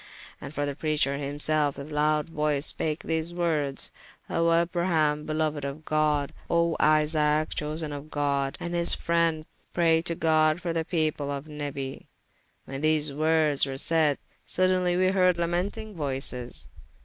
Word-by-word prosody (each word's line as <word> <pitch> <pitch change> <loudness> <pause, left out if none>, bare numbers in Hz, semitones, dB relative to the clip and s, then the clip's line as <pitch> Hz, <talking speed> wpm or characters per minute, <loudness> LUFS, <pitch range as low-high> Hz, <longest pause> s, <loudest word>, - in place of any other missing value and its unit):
And - - -7
the 145 -2 -3
preacher 150 -2 0
hymselfe 145 +1 +1
with 140 +2 -8
loude 150 0 +1
voyce 150 -2 0
spake 155 0 -1
these 160 +1 -2
wordes, 155 -6 -1 0.4
O 165 0 +2
Abraham 165 -3 +1
beloued 155 -2 -1
of 140 +3 -6
God, 150 -2 +1 0.2
O 170 -1 +2
Isaac 155 0 +2
chosen 150 0 -3
of 145 +1 -8
God, 140 -2 -1
and 170 - -5
his 170 0 +3
friend, 165 -2 0 0.3
praye 165 -2 +3
to 170 - 0
God 155 0 +2
for 175 -2 -3
the 165 -1 -1
people 155 -4 -1
of 140 0 -4
Nabi. 145 -3 -6 0.6
When 135 +1 -6
these 155 -1 +2
woordes 155 -1 +4
were 135 0 -5
sayde, 155 -1 +2 0.3
sodenly 185 -1 +1
were 185 0 +3
heard 185 -2 +3
lamenting 185 +6 -2
voyces. 135 -6 -3
155 Hz, 145 wpm, -26 LUFS, 145-165 Hz, 0.6 s, woordes